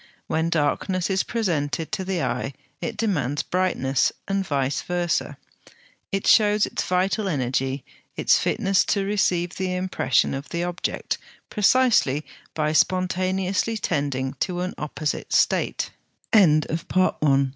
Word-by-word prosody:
When 160 +1 0
darkness 170 +4 0
is 190 0 +2
presented 165 - -2
to 210 -3 -2
the 185 -4 -2
eye 135 +2 -2 0.3
it 230 -3 -4
demands 150 - 0
brightness, 175 -8 +1 0.2
and 195 0 0
vice 140 -5 -1
versâ: 175 -2 -1 0.7
it 195 -1 -1
shows 210 -1 +5
its - - -3
vital 190 +3 0
energy, 135 -3 -1 0.3
its - - +4
fitness 195 0 +2
to 200 -2 0
receive 180 -4 0
the 185 -1 -1
impression 185 0 +1
of 135 +1 -6
the 170 0 -2
object, 175 0 -3 0.3
precisely 210 - +3 0.3
by 155 -1 0
spontaneously 185 +4 +1
tending 140 -7 -1
to 180 -1 -1
an 185 - -3
opposite 150 0 -3
state. - - +1
180 Hz, 120 wpm, -24 LUFS, 145-195 Hz, 0.7 s, shows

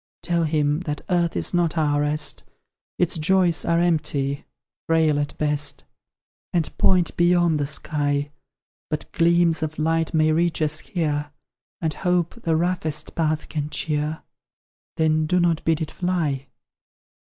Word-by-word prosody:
Tell 170 -1 +1
him, 150 -1 +1
that 150 -1 -3
earth 170 -2 +1
is - - 0
not 175 -2 +1
our 145 -2 +2
rest; 150 0 -1 0.5
Its 175 -1 0
joys 175 -1 +2
are 170 0 +2
empty 150 -5 0 0.4
frail 160 -2 +3
at 145 0 -3
best; 150 -2 -1 0.7
And 170 -3 -1
point 180 -3 +3
beyond 175 -2 +3
the 145 - 0
sky. 145 -1 -1 0.6
But 155 -1 -4
gleams 170 -1 +3
of 155 0 -3
light 160 +1 +1
may 155 -1 +3
reach 170 +1 +1
us 155 0 0
here; 150 -6 -2 0.5
And 160 -2 0
hope 180 -1 0
the 165 -5 +1
ROUGHEST 160 -3 -1
path 155 -2 0
can 150 -2 -3
cheer: 150 +1 -2 0.7
Then 155 -1 +2
do 180 +3 +2
not 170 -2 +1
bid 160 0 +2
it 160 - -3
fly! 155 -7 -1
160 Hz, 140 wpm, -23 LUFS, 150-170 Hz, 0.7 s, frail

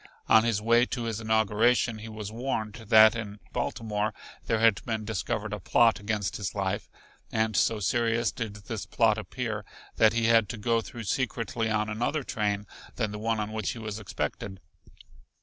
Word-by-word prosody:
On 110 - +6
his 110 -3 0
way 120 +2 +4
to 120 - -3
his 115 -1 -3
inauguration 110 +1 +2
he 110 +1 -8
was 110 -1 -6
warned 110 -3 -3 0.2
that 110 0 +8
in 105 -2 -6
Baltimore 105 - -2 0.3
there 115 - +2
had 110 -2 +3
been 110 -2 -3
discovered 110 0 -2
a 105 - -3
plot 115 +4 +3
against 105 -1 -2
his 100 -1 -4
life, 95 -2 -2 0.4
and 110 -1 0
so 105 +4 +2
serious 115 +3 +1
did 110 -4 -5
this 105 +1 -6
plot 110 -2 +2
appear 110 +1 -4 0.3
that 110 0 +5
he 115 -1 +1
had 115 -2 +4
to 115 - -4
go 115 +2 +1
through 115 +1 -8
secretly 115 -1 -1
on 105 -1 +1
another 120 +7 -1
train 105 -3 -1 0.3
than 110 -4 -1
the 105 - -6
one 115 0 0
on 105 0 -3
which 110 +1 -2
he - - -10
was 110 -1 -5
expected. 95 -1 -4
110 Hz, 180 wpm, -28 LUFS, 105-115 Hz, 0.4 s, that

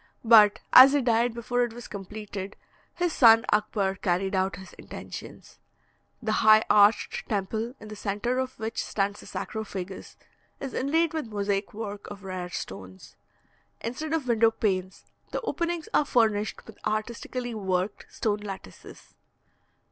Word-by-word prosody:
But 215 -3 +7
as 265 +2 +10
he 290 - +3
died 235 0 +2
before 245 +1 -1
it 240 -2 -3
was 240 0 -9
completed, 200 0 -7 0.4
his 350 -1 0
son 230 -1 +7
Akbar 205 -2 +1
carried 190 +1 -1
out 190 0 0
his 190 +1 -12
intentions. - - -10 0.6
The 220 - 0
high 215 0 +7
arched 210 +1 +3
temple, 220 +4 -2
in 215 - -11
the 215 - -7
centre 210 +5 -2
of 260 0 -3
which 220 +1 -3
stands 205 0 -2
the - - -12
sarcophagus, 195 -4 -6 0.4
is 270 -2 -6
inlaid 320 +5 +1
with 315 -6 -3
mosaic 200 -1 -1
work 205 -2 -7
of 205 -1 -10
rare 185 -2 -5
stones. 95 - -8 0.7
Instead 260 +7 -4
of 310 -5 -1
window 230 -1 +4
panes, 190 -4 -2 0.2
the - - -3
openings 340 -2 -2
are 300 - +3
furnished 215 -5 +1
with - - -14
artistically 235 +3 -3
worked 190 -1 -2
stone 210 -2 -1
lattices. 195 - -10
215 Hz, 145 wpm, -27 LUFS, 195-240 Hz, 0.7 s, as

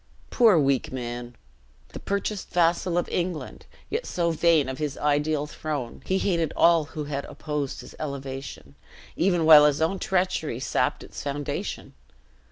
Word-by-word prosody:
Poor 225 -7 +5
weak 140 -3 +1
man. 120 -1 -6 0.5
The - - -9
purchased 200 0 -3
vassal 175 +1 +1
of 175 - 0
England; 175 -2 -4 0.2
yet 455 +3 -2
so 170 -1 0
vain 165 -3 +3
of 130 0 -5
his 150 -2 -3
ideal 150 0 +1
throne, 150 -5 -5
he 190 - +2
hated 170 -5 0
all 165 -2 +4
who 155 0 -6
had 140 -1 -4
opposed 150 -3 -4
his - - -12
elevation, 135 - -6 0.4
even 175 -3 +2
while 150 -2 +9
his 145 -1 0
own 165 +5 0
treachery 180 -9 -1
sapped 130 - -1
its - - -9
foundation! 145 0 -4
155 Hz, 150 wpm, -25 LUFS, 140-170 Hz, 0.5 s, while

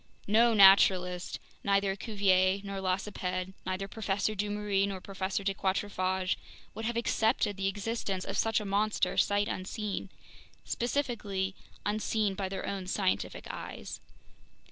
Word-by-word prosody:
No 225 +3 +4
naturalist, 185 -2 +6 0.3
neither 200 -1 +2
Cuvier 195 -3 +2
nor 200 -1 -5
Lacépède, 185 -1 -2
neither 190 +1 -2
Professor 205 0 -1
Dumeril 205 -1 0
nor 195 -1 -4
Professor 190 +1 -3
de 195 0 +1
Quatrefages, 190 -1 0 0.4
would 220 +1 -5
have 235 +1 -1
accepted 220 -3 +1
the 195 0 -1
existence 200 -1 -2
of - - -3
such 225 0 +2
a 210 - -6
monster 205 +2 +1
sight 205 0 +2
unseen—specifically, 205 +1 -3 0.3
unseen 210 0 0
by 190 0 -3
their 190 0 -4
own 190 -2 -4
scientific 190 0 -1
eyes. - - -7
195 Hz, 120 wpm, -30 LUFS, 190-210 Hz, 0.4 s, naturalist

